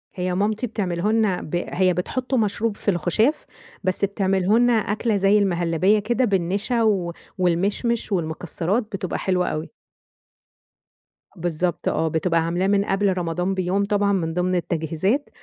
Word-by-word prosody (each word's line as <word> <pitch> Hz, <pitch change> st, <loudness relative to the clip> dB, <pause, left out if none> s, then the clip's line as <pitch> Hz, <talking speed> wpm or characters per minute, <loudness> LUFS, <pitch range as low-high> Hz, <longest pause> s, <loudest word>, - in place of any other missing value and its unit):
هي 180 Hz, -1 st, -2 dB
مامتي 215 Hz, +5 st, 0 dB
بتعمله 195 Hz, -2 st, -1 dB
لنا 215 Hz, -5 st, +1 dB
ب 155 Hz, -, -5 dB
هي 185 Hz, -1 st, +2 dB
بتحطه 255 Hz, +8 st, -2 dB
مشروب 210 Hz, 0 st, 0 dB
في 205 Hz, -, 0 dB
الخشاف، 200 Hz, -, +1 dB, 0.4 s
بس 185 Hz, +1 st, +1 dB
بتعمله 195 Hz, +2 st, +1 dB
لنا 245 Hz, 0 st, +4 dB
أكلة 220 Hz, 0 st, 0 dB
زي 200 Hz, +2 st, +4 dB
المهلبية 180 Hz, +1 st, +2 dB
كده 240 Hz, +5 st, +1 dB
بالنشا 200 Hz, +4 st, 0 dB
و 190 Hz, -6 st, +1 dB, 0.2 s
والمشمش 200 Hz, +7 st, 0 dB
والمكسرات، 175 Hz, +4 st, -1 dB
بتبقى 185 Hz, -3 st, -3 dB
حلوة 180 Hz, -1 st, 0 dB
أوي. 155 Hz, +1 st, -3 dB, 1.7 s
بالضبط 175 Hz, 0 st, -2 dB
آه. 160 Hz, -, +1 dB
بتبقى 165 Hz, +2 st, +1 dB
عاملاه 175 Hz, +3 st, 0 dB
من 200 Hz, 0 st, +2 dB
قبل 195 Hz, 0 st, +1 dB
رمضان 180 Hz, +2 st, -1 dB
بيوم 190 Hz, +2 st, 0 dB
طبعًا 205 Hz, 0 st, +1 dB
من 165 Hz, -4 st, -1 dB
ضمن 180 Hz, +1 st, 0 dB
التجهيزات، 175 Hz, -, -1 dB
190 Hz, 140 wpm, -23 LUFS, 175-210 Hz, 1.7 s, لنا